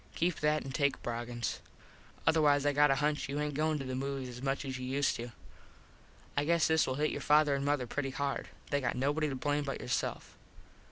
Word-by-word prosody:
Keep 175 Hz, 0 st, 0 dB
that 150 Hz, 0 st, +2 dB
and 135 Hz, -, -6 dB
take 140 Hz, 0 st, +1 dB
Broggins. 120 Hz, 0 st, -3 dB, 0.7 s
Otherwise 150 Hz, -3 st, +4 dB
I 145 Hz, -, +3 dB
got 145 Hz, +1 st, +5 dB
a 135 Hz, -, +4 dB
hunch 150 Hz, 0 st, 0 dB
you 140 Hz, +1 st, -2 dB
aint 150 Hz, 0 st, -1 dB
goin 155 Hz, +2 st, +1 dB
to 135 Hz, -, -5 dB
the 130 Hz, -, -4 dB
movies 135 Hz, 0 st, -3 dB
as 125 Hz, 0 st, -8 dB
much 135 Hz, +1 st, -1 dB
as 130 Hz, -1 st, -4 dB
you 130 Hz, -, -4 dB
used 140 Hz, +2 st, +1 dB
to. 120 Hz, +1 st, -6 dB, 1.0 s
I 145 Hz, -, +2 dB
guess 170 Hz, +1 st, +3 dB
this 160 Hz, 0 st, +3 dB
will 130 Hz, -, -1 dB
hit 150 Hz, +2 st, +1 dB
your -, -, -4 dB
father 150 Hz, -1 st, +4 dB
an 140 Hz, 0 st, -1 dB
mother 145 Hz, -3 st, +1 dB
pretty 135 Hz, +3 st, -2 dB
hard. 140 Hz, +1 st, -2 dB, 0.2 s
They 140 Hz, -1 st, +2 dB
got 125 Hz, -, -1 dB
nobody 145 Hz, +4 st, +1 dB
to 135 Hz, -, -3 dB
blame 145 Hz, +2 st, 0 dB
but 135 Hz, -1 st, -4 dB
yourself. 125 Hz, -, -3 dB
140 Hz, 220 wpm, -32 LUFS, 130-150 Hz, 1.0 s, got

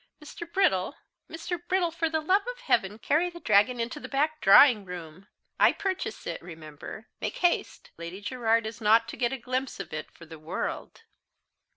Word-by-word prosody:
Mr. 330 Hz, +2 st, -9 dB
Brittle, 230 Hz, -, +2 dB, 0.3 s
Mr. 335 Hz, +1 st, -5 dB
Brittle, 370 Hz, -2 st, +1 dB
for 330 Hz, 0 st, -1 dB
the 315 Hz, 0 st, 0 dB
love 370 Hz, +6 st, +3 dB
of -, -, -6 dB
heaven, 210 Hz, -, +1 dB
carry 310 Hz, +9 st, +1 dB
the 345 Hz, 0 st, -11 dB
dragon 220 Hz, 0 st, +3 dB
into 240 Hz, +5 st, -3 dB
the -, -, -8 dB
back 305 Hz, +3 st, 0 dB
drawing 210 Hz, +2 st, +7 dB
room 180 Hz, 0 st, -9 dB, 0.3 s
I -, -, +6 dB
purchase 375 Hz, -, -3 dB
it, 170 Hz, -, -4 dB
remember! 160 Hz, +4 st, -10 dB, 0.2 s
make -, -, -3 dB
haste! 350 Hz, -1 st, 0 dB
Lady 170 Hz, +3 st, -7 dB
Gerard 230 Hz, 0 st, 0 dB
is 220 Hz, +1 st, -7 dB
not 225 Hz, +2 st, +4 dB
to -, -, -6 dB
get 240 Hz, -1 st, 0 dB
a 270 Hz, -, -3 dB
glimpse 255 Hz, 0 st, -3 dB
of 195 Hz, -, -7 dB
it 155 Hz, 0 st, -5 dB
for 165 Hz, -, -15 dB
the 160 Hz, -1 st, -11 dB
world." 160 Hz, -, -5 dB
235 Hz, 185 wpm, -28 LUFS, 190-320 Hz, 0.3 s, drawing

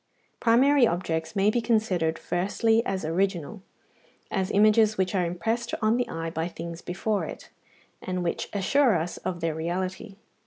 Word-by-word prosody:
Primary 250 Hz, +3 st, +5 dB
objects 160 Hz, -3 st, -2 dB
may 200 Hz, +1 st, +3 dB
be 240 Hz, -, 0 dB
considered 185 Hz, -9 st, +1 dB
firstly 220 Hz, +7 st, +1 dB
as 190 Hz, -4 st, -2 dB
original, 185 Hz, +2 st, -1 dB, 0.7 s
as 190 Hz, -2 st, -1 dB
images 215 Hz, +1 st, +4 dB
which 190 Hz, +1 st, 0 dB
are 185 Hz, -2 st, +2 dB
impressed 225 Hz, +7 st, -2 dB
on 220 Hz, 0 st, +2 dB
the 245 Hz, -, -1 dB
eye 165 Hz, 0 st, -4 dB
by 160 Hz, +1 st, -2 dB
things 170 Hz, -1 st, -7 dB
before 195 Hz, +2 st, -2 dB
it, -, -, -9 dB, 0.5 s
and 185 Hz, -1 st, -3 dB
which 170 Hz, -, -2 dB
assure 230 Hz, +4 st, +3 dB
us 170 Hz, +1 st, -2 dB
of 180 Hz, -2 st, -4 dB
their 165 Hz, -1 st, 0 dB
reality. 185 Hz, +5 st, -4 dB
190 Hz, 155 wpm, -26 LUFS, 170-220 Hz, 0.7 s, Primary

